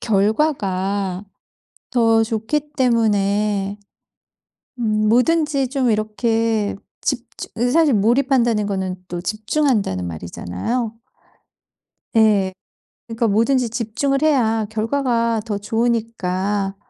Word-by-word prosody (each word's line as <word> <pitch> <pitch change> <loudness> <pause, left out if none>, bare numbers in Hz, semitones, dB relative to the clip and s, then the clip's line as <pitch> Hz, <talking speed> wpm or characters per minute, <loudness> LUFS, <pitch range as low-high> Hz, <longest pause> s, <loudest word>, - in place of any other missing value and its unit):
결과가 200 - 0 0.7
더 225 -2 +3
좋기 235 +7 -2
때문에 205 -4 +1 1.0
음 215 -2 +1
뭐든지 280 +2 +2
좀 260 -3 +1
이렇게 220 0 0 0.3
집주 255 -4 -3
으 245 +1 +2
사실 315 0 +4
몰입한다는 235 0 +2
거는 190 -2 -2
또 175 0 -4
집중한다는 215 - 0
말이잖아요. 90 - -4 1.2
예. 205 -4 +4 0.6
그러니까 230 0 -1
뭐든지 230 +4 +2
집중을 245 +5 -1
해야 225 -8 +2
결과가 230 0 0
더 205 -3 -2
좋으니까그런 205 -3 -1
225 Hz, 225 characters per minute, -20 LUFS, 205-245 Hz, 1.2 s, 사실